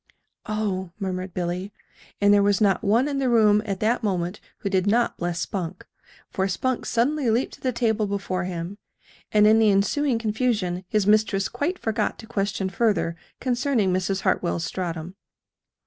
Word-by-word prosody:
"Oh!" 205 Hz, -4 st, -2 dB
murmured 185 Hz, -1 st, -3 dB
Billy. 180 Hz, +2 st, -3 dB, 0.5 s
And 205 Hz, 0 st, +5 dB
there 205 Hz, -, +5 dB
was 200 Hz, -1 st, +3 dB
not 195 Hz, -3 st, +2 dB
one 230 Hz, +7 st, +3 dB
in 280 Hz, -1 st, -1 dB
the 265 Hz, -2 st, +1 dB
room 210 Hz, -3 st, +5 dB
at 195 Hz, -2 st, -2 dB
that 230 Hz, +3 st, +2 dB
moment 185 Hz, -2 st, -2 dB, 0.2 s
who -, -, -2 dB
did 190 Hz, 0 st, +1 dB
not 235 Hz, +3 st, +2 dB
bless 170 Hz, -1 st, -2 dB
Spunk 175 Hz, +1 st, -4 dB, 0.5 s
for 190 Hz, 0 st, 0 dB
Spunk 250 Hz, +7 st, -1 dB
suddenly 255 Hz, +3 st, +1 dB
leaped 235 Hz, +4 st, +1 dB
to -, -, -13 dB
the 255 Hz, -, 0 dB
table 225 Hz, -3 st, 0 dB
before 190 Hz, -2 st, -2 dB
him; 180 Hz, +3 st, -5 dB, 0.5 s
and 210 Hz, 0 st, +5 dB
in 220 Hz, +1 st, +6 dB
the 220 Hz, -1 st, +5 dB
ensuing 230 Hz, +7 st, +2 dB
confusion 215 Hz, -5 st, -1 dB
his 210 Hz, +1 st, +1 dB
mistress 210 Hz, -2 st, +3 dB
quite 350 Hz, +6 st, -2 dB
forgot 220 Hz, -5 st, -1 dB
to -, -, -10 dB
question 200 Hz, -3 st, -2 dB
further 195 Hz, -4 st, 0 dB, 0.2 s
concerning 245 Hz, -6 st, +1 dB
Mrs. 190 Hz, +1 st, -1 dB
Hartwell's 170 Hz, -2 st, 0 dB
stratum. 175 Hz, -1 st, -4 dB
205 Hz, 165 wpm, -24 LUFS, 185-230 Hz, 0.5 s, in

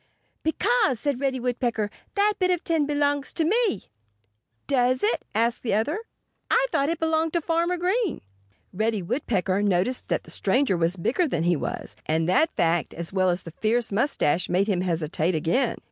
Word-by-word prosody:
"Because," 360 Hz, -, +1 dB
said 280 Hz, -1 st, -1 dB
Reddy 270 Hz, -2 st, 0 dB
Woodpecker, 240 Hz, -4 st, -1 dB, 0.2 s
"that 415 Hz, +1 st, +3 dB
bit 365 Hz, -1 st, +2 dB
of 355 Hz, -2 st, 0 dB
tin 320 Hz, -4 st, +1 dB
belongs 290 Hz, -1 st, 0 dB
to 325 Hz, -, 0 dB
me." 425 Hz, -, +1 dB, 0.8 s
"Does 255 Hz, -2 st, +1 dB
it?" 430 Hz, -, +1 dB
asked 230 Hz, +2 st, +1 dB
the 225 Hz, -, 0 dB
other. 290 Hz, -, 0 dB, 0.5 s
"I -, -, +4 dB
thought 280 Hz, -4 st, +1 dB
it 335 Hz, -, -1 dB
belonged 320 Hz, 0 st, 0 dB
to 340 Hz, -, +1 dB
Farmer 335 Hz, +2 st, 0 dB
Green." 375 Hz, +3 st, 0 dB, 0.5 s
Reddy 215 Hz, 0 st, 0 dB
Woodpecker 200 Hz, -, 0 dB
noticed 205 Hz, +5 st, 0 dB
that -, -, -1 dB
the -, -, -10 dB
stranger 265 Hz, -7 st, +1 dB
was 170 Hz, +2 st, +1 dB
bigger 295 Hz, -, +1 dB
than 170 Hz, -, -1 dB
he 175 Hz, 0 st, +3 dB
was. -, -, -5 dB
And 160 Hz, +1 st, +1 dB
that 250 Hz, -, +3 dB
fact, 165 Hz, -1 st, +1 dB
as 170 Hz, +2 st, -4 dB
well 185 Hz, -1 st, +2 dB
as 175 Hz, +1 st, -1 dB
the 165 Hz, -, -9 dB
fierce 230 Hz, +1 st, +1 dB
mustache, 195 Hz, -, +1 dB
made 185 Hz, +3 st, +2 dB
him 190 Hz, -4 st, +1 dB
hesitate 165 Hz, -1 st, 0 dB
again. 175 Hz, -, +1 dB
245 Hz, 175 wpm, -25 LUFS, -, 0.8 s, I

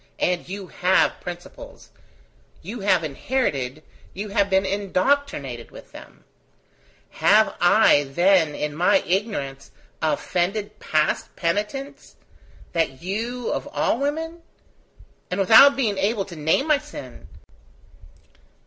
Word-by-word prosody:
and 180 Hz, -1 st, -1 dB
you 195 Hz, 0 st, -6 dB
have 180 Hz, +1 st, +1 dB
principles: 175 Hz, 0 st, -10 dB, 0.7 s
you 215 Hz, +8 st, -7 dB
have 190 Hz, -4 st, +2 dB
inherited, 150 Hz, -, -2 dB, 0.3 s
you 205 Hz, +3 st, -5 dB
have 200 Hz, 0 st, +1 dB
been 190 Hz, 0 st, +2 dB
indoctrinated 190 Hz, -, -1 dB
with -, -, -14 dB
them: -, -, -14 dB, 0.9 s
have -, -, +3 dB
I, 145 Hz, 0 st, +5 dB
then, 165 Hz, +2 st, +2 dB
in 150 Hz, 0 st, -3 dB
my 180 Hz, -, +3 dB
ignorance, 180 Hz, -9 st, -3 dB, 0.3 s
offended 190 Hz, +7 st, -1 dB
past 155 Hz, -1 st, -1 dB
penitence, 210 Hz, +11 st, -3 dB, 0.6 s
that 160 Hz, -4 st, -1 dB
you, 230 Hz, +6 st, -3 dB
of -, -, -3 dB
all 290 Hz, -5 st, 0 dB
women?... 320 Hz, +4 st, -3 dB, 0.9 s
And 180 Hz, -, -3 dB
without 225 Hz, +9 st, +7 dB
being 220 Hz, -8 st, 0 dB
able 200 Hz, 0 st, 0 dB
to 180 Hz, -, -10 dB
name 160 Hz, -, +1 dB
my 305 Hz, -2 st, +3 dB
sin! 300 Hz, 0 st, -11 dB
195 Hz, 115 wpm, -23 LUFS, 165-235 Hz, 0.9 s, without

